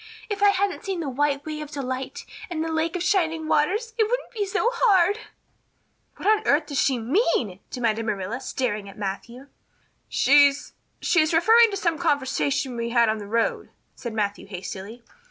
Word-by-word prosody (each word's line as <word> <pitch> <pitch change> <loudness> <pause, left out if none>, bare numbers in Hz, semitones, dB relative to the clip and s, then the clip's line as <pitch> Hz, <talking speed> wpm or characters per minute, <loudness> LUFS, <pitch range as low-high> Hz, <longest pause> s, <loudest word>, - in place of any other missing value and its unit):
If 400 - -3
I 410 - +6
hadn't 400 -1 0
seen 385 -3 -3
the 310 -4 -3
White 285 +1 0
Way 305 -1 -5
of 300 - -7
Delight 270 - -5 0.2
and 320 -3 -2
the 325 - -3
Lake 320 +2 -1
of 355 - -2
Shining 330 -5 +1
Waters 420 +10 +1
it 440 - +5
wouldn't - - -2
be 415 -4 -2
so 425 +5 +1
hard." 405 -4 +3 1.0
"What - - -4
on 430 0 +4
earth 300 +2 +3
does 285 -2 -1
she 265 -3 +2
mean?" 235 - 0
demanded 225 -3 -1
Marilla, 210 +3 -3
staring 215 -6 -3
at 195 - -14
Matthew. 215 +6 -6 0.6
"She 285 +1 +5
she's 285 - -9 0.4
just 315 -2 +2
referring 450 +8 +6
to 400 - -3
some 335 -4 -1
conversation 280 -4 0
we 235 0 -3
had 235 -1 +3
on 215 0 -1
the 205 - -8
road," 230 +2 -1 0.3
said 235 - -6
Matthew 205 -3 -2
hastily. 195 +4 -8
290 Hz, 180 wpm, -24 LUFS, 235-370 Hz, 1.0 s, I